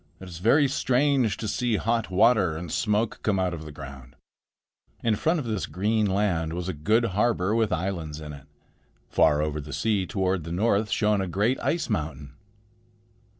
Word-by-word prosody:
"It 95 - -10
is 85 -2 -9
very 140 - +4
strange 130 -5 +1
to 110 - -4
see 120 +2 0
hot 115 +1 0
water 95 -4 +3
and 85 -1 -6
smoke 105 0 0
come 105 -5 +1
out 90 -1 0
of 80 -2 -7
the 75 - -8
ground." 70 -3 -11 0.9
In 115 -2 +2
front 160 +10 +1
of 140 - -4
this 110 -4 -2
green 105 +6 0
land 95 -5 0
was 90 +1 -4
a 95 - -2
good 110 +11 +2
harbor 105 -2 +1
with 115 -2 +1
islands 85 -4 -3
in 75 -1 -8
it. 70 0 -12 0.6
Far 75 0 +3
over 75 0 -2
the 75 +2 -10
sea 105 -5 0
toward 95 -3 -1
the 85 - -7
north 105 +3 +1
shone 105 -2 +1
a 95 - -2
great 105 +8 0
ice 170 +1 0
mountain. 75 -2 -4
95 Hz, 185 wpm, -26 LUFS, 80-110 Hz, 0.9 s, very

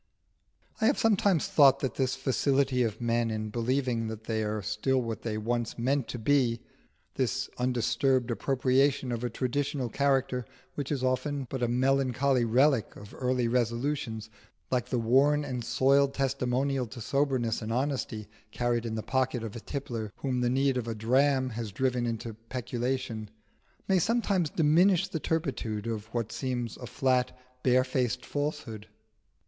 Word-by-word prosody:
I 220 - +4
have 275 - +3
sometimes 205 -6 +3
thought 140 -2 +5
that 135 - -1
this 130 -1 0
facility 135 -1 +1
of 115 -4 -1
men 115 0 +1
in 110 -1 -3
believing 120 0 0
that 110 0 -6
they 110 -1 -1
are 105 -1 -2
still 110 +6 0
what 115 -3 -4
they 110 -2 -3
once 115 +1 -2
meant 130 +2 0
to - - -5
be 120 -1 +2 0.6
this 130 0 -1
undisturbed 125 +1 +1
appropriation 135 +1 +1
of 120 0 -3
a 120 - 0
traditional 130 0 -2
character 135 -1 +1 0.3
which 145 -1 -4
is 135 -3 -1
often 130 +2 0
but 130 - -3
a 120 - +2
melancholy 130 +1 +2
relic 125 +1 +2
of 105 0 -12
early 125 -2 0
resolutions, 115 -1 -1 0.4
like 125 -2 0
the 125 - -1
worn 135 +6 +3
and 125 -3 -4
soiled 135 +3 +3
testimonial 135 -1 0
to 120 +3 -10
soberness 130 -2 0
and 110 0 -4
honesty 125 -4 -2 0.2
carried 120 0 -1
in 110 - -3
the 110 - -3
pocket 130 -2 0
of 110 -1 -6
a - - -5
tippler 115 -5 -5
whom 130 -2 -2
the 120 - +2
need 135 +1 +2
of 120 -2 -3
a 115 - -3
dram 130 +4 +2
has 110 -2 -5
driven 125 +2 0
into 115 0 -4
peculation 120 -1 -4 0.6
may 190 -1 +4
sometimes 200 -5 +1
diminish 170 +5 +3
the 160 - -4
turpitude 130 -9 -2
of 110 -2 -4
what 115 -1 -3
seems 125 -4 -3
a 125 - -8
flat, 130 0 +1 0.2
barefaced 125 -1 +1
falsehood. 125 -7 -4
125 Hz, 155 wpm, -29 LUFS, 115-135 Hz, 0.6 s, thought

